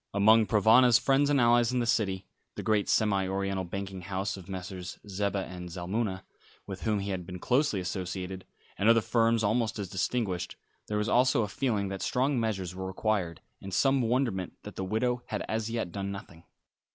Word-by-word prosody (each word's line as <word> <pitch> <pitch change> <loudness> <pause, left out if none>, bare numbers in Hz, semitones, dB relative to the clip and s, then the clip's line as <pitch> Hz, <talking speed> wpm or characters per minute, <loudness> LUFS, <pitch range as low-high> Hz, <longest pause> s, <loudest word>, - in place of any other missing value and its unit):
Among 110 +2 +5
Provana's 115 +3 +6
friends 140 +3 +2
and 145 -1 +3
allies 120 -1 +4
in 125 - 0
the 120 - +1
City 95 -5 0 0.3
the - - -5
great 105 -2 +1
semi 100 -3 +2
oriental 95 0 -1
banking 95 +1 -5
house 95 +2 -3
of 95 -1 -11
Messrs. 90 -1 -6
Zeba 100 0 -1
and 90 -1 -8
Zalmunna, 95 +3 -3 0.4
with 95 -2 -7
whom 105 -2 0
he 100 0 -3
had 95 -2 -3
been 90 +1 -7
closely 125 - +1
associated, 90 0 -4 0.4
and 105 - +4
other 115 0 +7
firms 115 0 +2
almost 110 +2 +1
as 100 -3 -4
distinguished 95 -2 -2 0.3
there 105 - -1
was 105 +1 0
also 125 -2 +3
a - - -2
feeling 105 -2 -1
that 95 -1 -5
strong 130 +1 +1
measures 95 -6 -2
were 95 0 -5
required, 95 -3 -1 0.2
and 95 - -7
some 135 -1 +3
wonderment 115 -6 0
that - - -9
the 95 - -3
widow 120 +5 0
had - - -3
as 110 0 -2
yet 115 -6 -2
done 100 +2 -4
nothing. 100 -5 -10
100 Hz, 190 wpm, -29 LUFS, 95-115 Hz, 0.4 s, other